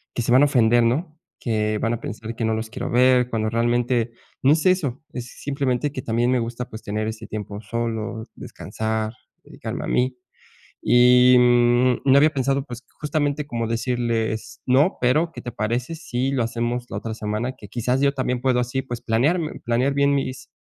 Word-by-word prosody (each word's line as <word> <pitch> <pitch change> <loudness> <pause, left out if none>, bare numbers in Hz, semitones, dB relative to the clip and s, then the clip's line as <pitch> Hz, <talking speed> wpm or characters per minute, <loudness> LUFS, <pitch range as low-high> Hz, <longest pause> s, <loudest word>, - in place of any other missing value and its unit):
que - - 0
se 120 - -1
van 130 +3 +6
a - - +7
ofender, 120 -4 +4
¿no? 155 +7 -1 0.2
Que 110 -2 -1
van 115 - 0
a 120 - -3
pensar 115 +1 -6
que 115 - -2
no 110 - +1
los 110 0 -3
quiero - - -5
ver, 125 0 +4
cuando 110 -1 0
realmente 120 0 +1 0.3
no 135 - +5
es 155 0 0
eso, 155 -9 +1
es 125 -2 -6 0.2
simplemente 140 0 -1
que 130 -3 -6
también 120 +2 +1
me 130 - +3
gusta, 120 +1 -4
pues 110 - -9
tener 105 +1 -2
ese 110 0 -6
tiempo 105 -1 -6
solo, 115 -1 -3
descansar, 110 0 -4 0.3
dedicarme - - -6
a - - -5
mí. 125 +1 +1 0.7
Y, 125 +1 +6
mm, 120 0 +4
no 135 - +7
había 150 +3 +6
pensado 135 0 0
pues, 125 -3 -9 0.2
justamente 150 -1 -1
como 115 -4 -3
decirles: 115 -2 -2
"No, 140 +9 +3
pero 155 +7 +2
¿qué - - -9
te 120 - -6
parece 120 +7 -2
si 130 -4 -2
lo 130 -3 +1
hacemos 120 +1 -2
la - - -6
otra 115 - -5
semana?". 110 +4 -3
Que 105 - -12
quizás 125 +4 -1
yo 140 0 +3
también 125 -2 -1
puedo 130 -1 +2
así 125 +2 -2
pues, 120 -3 -6
planearme 150 +9 0
planear 125 +3 +1
bien 140 0 +3
mis 130 -2 -3
120 Hz, 190 wpm, -23 LUFS, 115-130 Hz, 0.7 s, a